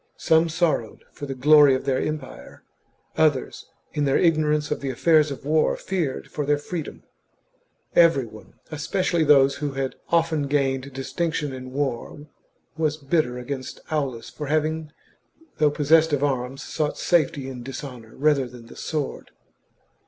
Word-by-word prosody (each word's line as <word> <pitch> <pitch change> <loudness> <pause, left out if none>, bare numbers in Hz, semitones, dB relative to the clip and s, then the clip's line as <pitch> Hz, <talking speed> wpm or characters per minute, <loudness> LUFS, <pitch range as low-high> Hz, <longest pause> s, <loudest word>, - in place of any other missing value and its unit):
Some 160 +1 +3
sorrowed 160 -9 -1
for 145 - -8
the 135 - -4
glory 145 +1 +6
of 130 - -4
their 135 -2 +1
empire, 155 0 -6 0.6
others, 150 -5 +1 0.3
in 150 - 0
their 135 - +3
ignorance 150 -3 +2
of - - -2
the 140 - -3
affairs 155 +2 +3
of 140 -1 -7
war, 155 +1 +2
feared 170 -8 -3
for 150 - -2
their 145 +1 +2
freedom. 160 +1 -6 0.9
Every 165 -7 +5
one, 110 -1 -12
and - - -24 0.2
especially 165 +2 0
those 140 -2 +5
who 145 -2 -3
had 135 -1 -2 0.2
often 165 -3 +1
gained 135 -1 0
dis 135 0 -7
tinction 160 -4 -1
in 130 0 -8
war, 140 +1 -3 0.5
was 155 -1 0
bitter 140 -3 0
against 130 +1 -6
Aulus 135 -7 -2
for 150 - -6
having, 155 +1 -1 0.7
though 150 -1 +5
possessed 155 +2 +3
of 145 -1 +1
arms, 135 -1 -2
sought 150 -1 -2
safety 150 -5 +1
in 130 -2 -7
dishonour 125 -3 -8
rather 145 -2 +2
than 120 -1 -13
the - - -13
sword. 150 -3 -4
145 Hz, 155 wpm, -24 LUFS, 135-155 Hz, 0.9 s, glory